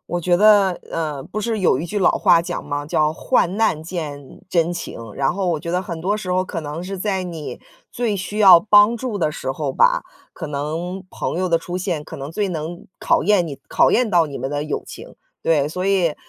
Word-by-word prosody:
我 175 0 -2
觉 175 +1 +2
得， 200 -2 +5
呃， 150 -4 -3
不 215 - -5
是 225 +1 -1
有 155 -7 +3
一 160 - -3
句 205 +4 -2
老 185 - +4
话 175 -4 +4
讲 - - -5
吗， 145 0 -3
叫： 155 0 +1
“患 190 +1 +1
难 220 -9 +1
见 150 -5 -7
真 170 -1 +1
情。” 175 - -6 0.2
然 135 -1 +1
后 195 -2 -2
我 160 -3 0
觉 170 - -5
得 180 - +1
很 170 -4 -6
多 200 +5 0
时 190 -4 -5
候 185 +1 +1
可 175 -3 -5
能 150 +2 -6
是 190 +1 -6
在 190 -1 -1
你 165 -4 -7 0.3
最 230 -4 -1
需 200 +3 -5
要 190 -4 +9
帮 210 +3 +5
助 235 -3 -4
的 160 -4 +1
时 130 -4 -4
候 140 -1 -3
吧， - - +3 0.3
可 - - -7
能 160 +6 -4
朋 170 - -3
友 185 -1 0
的 165 - +3
出 175 +2 -5
现 175 -5 -2
可 - - -9
能 140 +2 -6
最 200 +4 -1
能 165 0 -5
考 - - +2
验 200 -4 +3
你 140 -4 -7
考 - - +4
验 240 -3 +2
到 170 -2 +4
你 140 -2 -7
们 135 +2 -4
的 145 0 -2
友 150 - -3
情。 - - -11 0.3
对， 150 -4 +2
所 180 +4 -3
以， 185 -6 +2
175 Hz, 245 characters per minute, -21 LUFS, 155-195 Hz, 0.3 s, 要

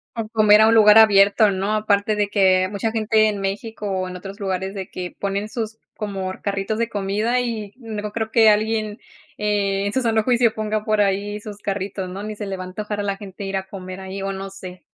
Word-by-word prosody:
O 225 -2 -3
comer 215 -1 +5
a 220 - +6
un 225 - +4
lugar 215 -1 +7
abierto, 205 0 +6
¿no? 195 +3 -1
Aparte 210 0 +1
de 205 -1 +1
que 185 -2 +3
mucha 210 +2 -2
gente 220 -1 +2
en 205 -1 -3
México 205 +2 -4
o 185 -1 -2
en 180 - -8
otros 195 +3 -9
lugares, 190 -1 -3
de 190 -2 -6
que 180 -1 -6
ponen 200 +1 -2
sus 220 -2 -4 0.2
como 195 -3 -4
carritos 200 +2 -2
de 235 0 0
comida 210 +4 0
y 220 -4 -4
no 215 -4 -6
creo 220 0 -3
que 225 -1 +6
alguien, 215 0 0 0.4
eh, 200 -1 0
en 200 - -2
su 260 - +1
sano 225 -3 +1
juicio 240 -2 +3
ponga 215 -1 -2
por 215 -1 +2
ahí 205 +1 0
sus 210 -1 -9
carritos, 195 -2 -4
¿no?, 195 +3 -6
ni 215 0 -5
se 205 - -6
le 195 - -4
va 185 - -5
a - - -7
antojar 210 +2 -5
a - - -1
la 200 -1 -2
gente 195 -1 -9
ir 195 0 -2
a 190 0 -5
comer 185 -1 -8
ahí, 190 +1 -6
o 195 - -2
no 195 0 -6
sé. 185 -2 -10
205 Hz, 230 wpm, -21 LUFS, 195-215 Hz, 0.4 s, lugar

